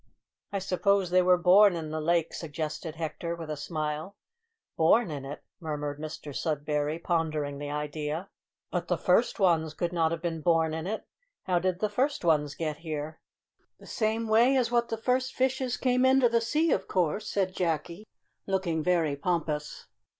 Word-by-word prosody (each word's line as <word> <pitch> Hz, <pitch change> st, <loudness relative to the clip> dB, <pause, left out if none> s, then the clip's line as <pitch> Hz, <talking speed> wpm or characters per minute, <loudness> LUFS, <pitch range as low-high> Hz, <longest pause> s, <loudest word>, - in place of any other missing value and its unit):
"I 200 Hz, -, -1 dB
suppose 195 Hz, 0 st, +1 dB
they 185 Hz, 0 st, +5 dB
were 180 Hz, 0 st, +5 dB
born 185 Hz, +2 st, +6 dB
in 160 Hz, -2 st, -5 dB
the 155 Hz, 0 st, -2 dB
lake," 165 Hz, +1 st, +1 dB
suggested 155 Hz, 0 st, -5 dB
Hector, 170 Hz, +1 st, -4 dB
with 165 Hz, -2 st, -7 dB
a -, -, -2 dB
smile. 155 Hz, +4 st, -4 dB, 0.6 s
"Born 170 Hz, +4 st, +4 dB
in 140 Hz, -2 st, -5 dB
it?" 140 Hz, +2 st, -7 dB, 0.2 s
murmured 150 Hz, -3 st, -4 dB
Mr 155 Hz, -1 st, -7 dB
Sudberry, 150 Hz, -1 st, -1 dB
pondering 155 Hz, -4 st, -1 dB
the 145 Hz, 0 st, -5 dB
idea; 150 Hz, +3 st, -3 dB, 0.4 s
"but 175 Hz, -1 st, -2 dB
the 175 Hz, -, +1 dB
first 205 Hz, +8 st, +2 dB
ones 160 Hz, -5 st, +2 dB
could 175 Hz, +1 st, -2 dB
not 165 Hz, -2 st, +2 dB
have 165 Hz, 0 st, -4 dB
been 165 Hz, -2 st, -2 dB
born 160 Hz, 0 st, +2 dB
in 160 Hz, +2 st, -4 dB
it. 220 Hz, +2 st, -4 dB, 0.4 s
How 180 Hz, -2 st, +1 dB
did 185 Hz, 0 st, -1 dB
the 215 Hz, -, +2 dB
first 255 Hz, +2 st, -1 dB
ones 150 Hz, -3 st, +2 dB
get 155 Hz, -2 st, -3 dB
there?" 155 Hz, -1 st, -5 dB, 0.6 s
"The -, -, -15 dB
same 225 Hz, 0 st, -1 dB
way 235 Hz, +5 st, +5 dB
as 240 Hz, -2 st, +1 dB
what 235 Hz, -1 st, +2 dB
the 225 Hz, -, -2 dB
first 255 Hz, +3 st, 0 dB
fishes 260 Hz, -1 st, 0 dB
came 250 Hz, -1 st, +2 dB
into 260 Hz, -1 st, +5 dB
the 230 Hz, 0 st, +2 dB
sea, 305 Hz, +8 st, +1 dB
of -, -, 0 dB
course," 185 Hz, +4 st, 0 dB
said 190 Hz, -2 st, 0 dB
Jacky, 170 Hz, +3 st, -2 dB, 0.4 s
looking 185 Hz, -5 st, 0 dB
very 165 Hz, -4 st, +1 dB
pompous. 150 Hz, -1 st, -2 dB
170 Hz, 175 wpm, -28 LUFS, 155-200 Hz, 0.6 s, born